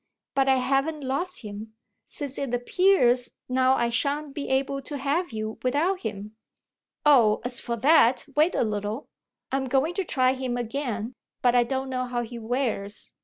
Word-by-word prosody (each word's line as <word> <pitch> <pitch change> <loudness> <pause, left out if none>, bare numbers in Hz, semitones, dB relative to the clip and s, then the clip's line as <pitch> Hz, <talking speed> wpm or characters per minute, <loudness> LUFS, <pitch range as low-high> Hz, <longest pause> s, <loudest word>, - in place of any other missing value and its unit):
"But 270 0 +2
I 265 - +5
haven't 275 +4 0
lost 285 +7 -2
him, 215 +1 -8 0.3
since 285 -3 -4
it 265 -3 -1
appears 250 -4 +3 0.2
now 255 +1 +3
I 235 -2 0
shan't 280 +4 -1
be 285 - -5
able 275 +1 0
to 290 +2 -5
have 285 +5 -1
you 220 0 -5
without 310 +9 +1
him." 210 -1 -6 0.7
"Oh, 235 -8 +5
as 245 0 0
for 235 - -3
that, 260 0 +4
wait 310 +4 +3
a - - +2
little. 210 +3 -3 0.4
I'm 270 0 0
going 270 +6 +1
to 390 - -1
try 255 -6 +2
him 255 -2 -3
again, 240 -1 -3 0.3
but 245 -1 +4
I 245 -1 +5
don't 265 +2 -3
know 255 0 -1
how 245 -1 -2
he 235 +1 -8
wears. 225 -4 -2
255 Hz, 170 wpm, -26 LUFS, 235-280 Hz, 0.7 s, I